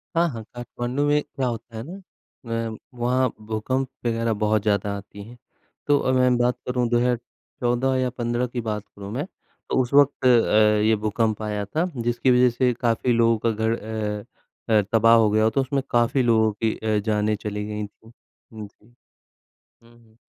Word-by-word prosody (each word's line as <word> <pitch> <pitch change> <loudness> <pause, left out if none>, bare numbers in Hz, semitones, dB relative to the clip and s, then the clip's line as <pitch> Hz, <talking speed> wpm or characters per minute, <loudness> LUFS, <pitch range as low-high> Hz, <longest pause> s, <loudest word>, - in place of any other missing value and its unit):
हाँ, 170 +1 +3
हाँ, 115 -4 -7
काठमांडू 120 +3 -3
में 150 0 +3
क्या 130 -2 -4
होता 115 -1 -6
है 110 - -5
ना, 175 +9 -9 0.7
अ, 110 - -8 0.2
वहाँ 125 +1 +2
भूकंप 110 +5 -2 0.2
वगैरह 115 -1 0
बहुत 105 0 +2
ज़्यादा 100 -1 0
आती 100 0 -11
है, 120 +3 -13 0.5
तो 145 - +4
अ, 130 - 0
मैं 125 -1 +3
बात 120 0 +1
करूँ 125 -1 0
2014 120 +1 -1
या 130 -1 0
15 120 0 -2
की 120 0 -4
बात 105 -2 -3
करूँ 100 0 -8
मैं 130 +8 -3 0.4
तो 130 - +2
उस 125 +2 -4
वक़्त 140 -2 +4
अ, 110 -3 +4
ये 110 0 +4
भूकंप 110 +1 -1
आया 105 -1 -3
था, 160 - -1
जिसकी 120 +2 +1
वजह 125 0 +5
से 125 +1 +1
काफ़ी 120 +1 0
लोगों 115 -1 +3
का 115 - +3
घर 110 +1 -1
अ 105 -1 -4 0.5
अ, 110 -2 +5
तबाह 115 0 +5
हो 110 -2 +4
गया 110 +1 +3
हो 110 - +4
तो 135 - +3
उसमें 135 +1 -1
काफ़ी 120 +3 +2
लोगों 110 -2 +3
की 110 - +1
अ, 110 -1 0
जानें 105 -1 +1
चली 105 0 -4
गई 105 0 -4
थी। 110 +2 -21 0.4
हुँ, 110 -1 -7
जी, 105 - -28 1.0
हुँ, 115 0 -21
हुँ। 110 0 -26
115 Hz, 185 wpm, -23 LUFS, 110-125 Hz, 1.0 s, वजह